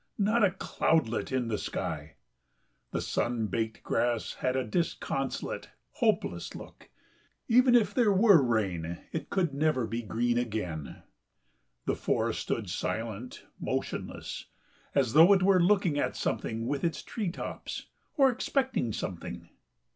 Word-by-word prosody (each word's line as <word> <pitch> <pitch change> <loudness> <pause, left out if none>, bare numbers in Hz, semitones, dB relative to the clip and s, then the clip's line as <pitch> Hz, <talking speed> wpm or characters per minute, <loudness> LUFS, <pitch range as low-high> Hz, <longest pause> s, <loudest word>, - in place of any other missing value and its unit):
Not 215 +3 +3
a 200 - +6
cloudlet 160 - 0
in 130 -2 0
the 110 -2 -1
sky.... 80 -4 -4 0.7
The - - -2
sun 120 -2 0
baked 110 +2 -3
grass 120 -2 0
had 130 0 -1
a 130 - +1
disconsolate, 165 +9 -2 0.2
hopeless - - 0
look: - - -11 0.6
even 245 +1 +6
if 235 -3 +4
there 235 -5 +4
were 195 -4 +6
rain 95 -9 0
it 160 - -4
could 175 -7 0
never 140 -4 +1
be 115 +2 -3
green 120 +2 0
again.... 105 - -4 0.8
The - - +1
forest - - 0
stood - - -2
silent, 115 +2 -4
motionless, - - -4 0.5
as 130 -5 +2
though 165 +6 +8
it 190 -2 +3
were 190 -1 +5
looking 180 -5 +3
at - - 0
something 115 +1 -2
with 140 +2 -2
its 170 -1 -1
tree 210 -6 -3
tops 175 - -6 0.3
or 270 -2 +5
expecting 260 - 0
something. 85 -11 -5
130 Hz, 135 wpm, -29 LUFS, -, 0.8 s, though